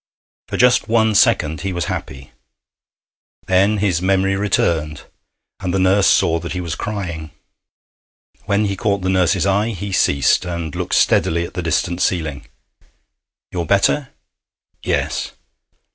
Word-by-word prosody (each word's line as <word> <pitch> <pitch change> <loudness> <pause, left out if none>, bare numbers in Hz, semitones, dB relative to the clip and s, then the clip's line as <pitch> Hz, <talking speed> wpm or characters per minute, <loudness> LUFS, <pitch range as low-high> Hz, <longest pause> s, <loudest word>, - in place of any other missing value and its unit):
For - - -4
just 125 -2 +3
one 110 -1 +2
second 85 - +2
he 95 - -3
was 85 -3 -2
happy. 65 -2 -6 1.1
Then 95 +3 +2
his 95 -4 0
memory 95 +1 +1
returned, 85 -7 -1 0.6
and 90 -2 -3
the 95 - 0
nurse 95 +1 +3
saw 85 0 +3
that 85 +1 -6
he 90 - -3
was 85 -2 -4
crying. 85 -6 -5 1.2
When 100 +1 +1
he 100 -1 -2
caught 100 +1 -1
the 95 - 0
nurse's 95 -1 +2
eye 100 +3 +1
he 100 +1 -6
ceased, 70 -6 +2
and 85 -4 -5
looked - - -2
steadily 85 +1 +2
at - - -11
the 90 - -3
distant 85 +2 -1
ceiling. 75 -5 -2 1.0
'You're 85 -3 -3
better?' 130 +8 +2 0.7
'Yes.' - - -2
95 Hz, 140 wpm, -19 LUFS, 85-100 Hz, 1.2 s, just